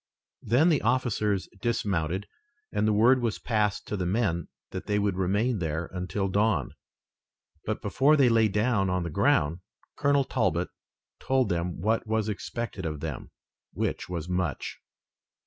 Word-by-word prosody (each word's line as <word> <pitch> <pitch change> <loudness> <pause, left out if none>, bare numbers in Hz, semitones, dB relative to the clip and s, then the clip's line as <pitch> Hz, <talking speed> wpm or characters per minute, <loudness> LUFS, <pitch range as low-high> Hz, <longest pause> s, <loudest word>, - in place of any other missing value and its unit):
Then 135 +10 +3
the 155 -5 +3
officers 110 -5 +1
dismounted, 95 -5 -1 0.5
and 105 +1 +1
the - - +3
word 120 +5 +5
was 115 -3 0
passed 105 -3 0
to - - -2
the 90 -3 -2
men 90 -5 0 0.2
that 95 +1 -6
they 105 -1 +1
would 100 -2 +1
remain 100 +5 +1
there 80 0 -3
until 95 +2 -2
dawn, 100 - +1 0.9
but - - -3
before 150 +3 +3
they 135 -3 +5
lay 115 -2 +4
down 105 -1 +1
on 90 -1 0
the 85 - -4
ground 75 +3 +2 0.4
Colonel 140 -1 +3
Talbot 95 - 0 0.5
told 130 -1 +1
them 85 -1 -2
what 110 +3 +1
was 110 -1 0
expected 105 -1 -4
of 75 -3 -3
them, 75 -3 -5 0.4
which - - -2
was 85 -2 -4
much. 90 -4 -2
105 Hz, 150 wpm, -27 LUFS, 90-115 Hz, 0.9 s, word